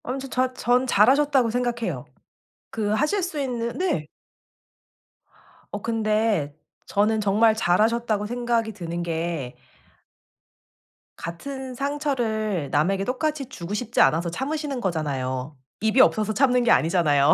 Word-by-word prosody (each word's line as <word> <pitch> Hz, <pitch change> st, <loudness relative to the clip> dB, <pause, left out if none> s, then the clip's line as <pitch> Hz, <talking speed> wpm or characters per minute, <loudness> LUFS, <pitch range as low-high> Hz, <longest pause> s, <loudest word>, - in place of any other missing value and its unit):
아무튼 270 Hz, +2 st, -5 dB
자 255 Hz, 0 st, 0 dB
전 250 Hz, +1 st, +1 dB
잘하셨다고 260 Hz, +3 st, +4 dB
생각해요. 240 Hz, -1 st, -2 dB, 0.7 s
그 215 Hz, -2 st, -2 dB
하실 300 Hz, -, +1 dB
수 345 Hz, -4 st, -3 dB
있는 240 Hz, -3 st, -3 dB
네. 260 Hz, -, -1 dB, 1.6 s
어 205 Hz, -, -5 dB
근데 215 Hz, -8 st, 0 dB, 0.3 s
저는 215 Hz, +2 st, +1 dB
정말 215 Hz, +2 st, +3 dB
잘하셨다고 220 Hz, +2 st, +1 dB
생각이 235 Hz, -1 st, -1 dB
드는 170 Hz, -3 st, -5 dB
게 165 Hz, -6 st, -3 dB, 1.6 s
같은 260 Hz, +9 st, -6 dB
상처를 235 Hz, -, -1 dB
남에게 185 Hz, +8 st, +1 dB
똑같이 280 Hz, +2 st, -2 dB
주고 200 Hz, -7 st, -7 dB
싶지 230 Hz, +2 st, 0 dB
않아서 170 Hz, +2 st, +3 dB
참으시는 280 Hz, -, -3 dB
거잖아요. 140 Hz, -, -2 dB, 0.3 s
입이 220 Hz, +4 st, +4 dB
없어서 215 Hz, -3 st, +3 dB
참는 250 Hz, +1 st, +3 dB
게 235 Hz, -, +3 dB
아니잖아요. 155 Hz, -3 st, +4 dB
220 Hz, 270 characters per minute, -24 LUFS, 175-255 Hz, 1.6 s, 잘하셨다고